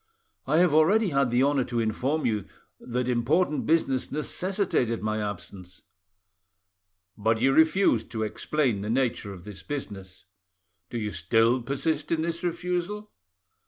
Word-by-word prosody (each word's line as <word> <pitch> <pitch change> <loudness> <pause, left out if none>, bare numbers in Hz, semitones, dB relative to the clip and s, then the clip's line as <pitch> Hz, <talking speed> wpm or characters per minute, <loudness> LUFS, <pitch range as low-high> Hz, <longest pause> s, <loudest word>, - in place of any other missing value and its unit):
"I 150 +3 +2
have 175 -3 +4
already 195 +7 +4
had 140 -4 +2
the 120 +2 +3
honour 140 -1 +2
to 120 -1 -2
inform 125 +8 -1
you 105 -5 0 0.3
that 125 0 -3
important 145 +7 +1
business 145 -5 +1
necessitated 155 - -1
my 110 0 -1
absence." 95 -3 -7 1.3
"But 110 +1 +1
you 135 +3 +3
refused 160 - +3
to 110 -2 -3
explain 120 0 -1
the 105 - -4
nature 120 -4 0
of 90 -3 -10
this 105 -1 -9
business. 100 -10 -7 0.6
Do 120 - -4
you 105 -2 -2
still 115 +9 +2
persist 145 +4 -2
in 160 -1 +1
this 170 +1 -3
refusal?" 180 +4 -3
130 Hz, 140 wpm, -27 LUFS, 110-160 Hz, 1.3 s, have